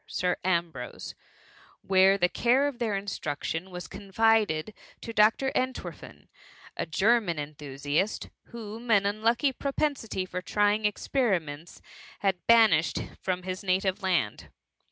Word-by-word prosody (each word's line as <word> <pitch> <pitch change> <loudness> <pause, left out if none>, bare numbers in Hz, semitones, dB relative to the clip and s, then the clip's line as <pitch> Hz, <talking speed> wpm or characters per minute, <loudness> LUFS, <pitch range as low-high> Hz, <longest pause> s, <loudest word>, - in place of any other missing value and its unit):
Sir 180 -1 0
Ambrose, 170 -9 -2 0.7
where 190 +1 +5
the 175 -2 +3
care 250 +9 +2
of 270 -4 -5
their 220 -4 0
instruction 175 -2 -4
was 180 -1 -7
confided 210 -3 +1 0.3
to 230 - -6
Dr. 225 +5 +3
Ent« 255 0 0
werfen, - - -10 0.5
a - - -3
German 195 +1 +2
enthusiast, 145 +4 -3 0.2
whom 230 0 -9
an 200 -3 +4
unlucky 230 +6 +1
propensity 275 -8 -2
for 180 0 -5
trying 210 +2 +1
experiments 180 - -1 0.4
had 190 -3 -1
banished 220 -9 +5 0.2
from 185 -1 -2
his 185 0 -4
native 190 0 0
land. 175 - -1
195 Hz, 120 wpm, -28 LUFS, 175-225 Hz, 0.7 s, where